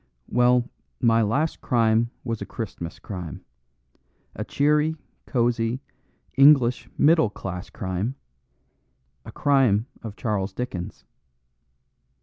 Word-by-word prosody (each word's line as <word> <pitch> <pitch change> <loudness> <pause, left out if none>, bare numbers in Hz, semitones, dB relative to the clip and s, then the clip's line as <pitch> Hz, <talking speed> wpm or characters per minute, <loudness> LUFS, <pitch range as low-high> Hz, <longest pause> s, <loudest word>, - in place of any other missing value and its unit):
"Well, 125 0 +3 0.3
my 115 -1 +4
last 140 +9 0
crime 115 -1 +2
was 115 -3 -3
a - - -3
Christmas 95 -7 -6
crime, 90 -5 -7 0.9
a - - -3
cheery, 150 +2 +2 0.3
cosy, 120 -1 0 0.6
English 135 -3 +5
middle 160 -6 +4
class 95 -2 -6
crime; 100 +4 -3 1.1
a - - -8
crime 130 -7 +3 0.2
of 110 -3 -7
Charles 105 -5 -2
Dickens. 95 -7 -5
115 Hz, 100 wpm, -24 LUFS, 105-130 Hz, 1.1 s, English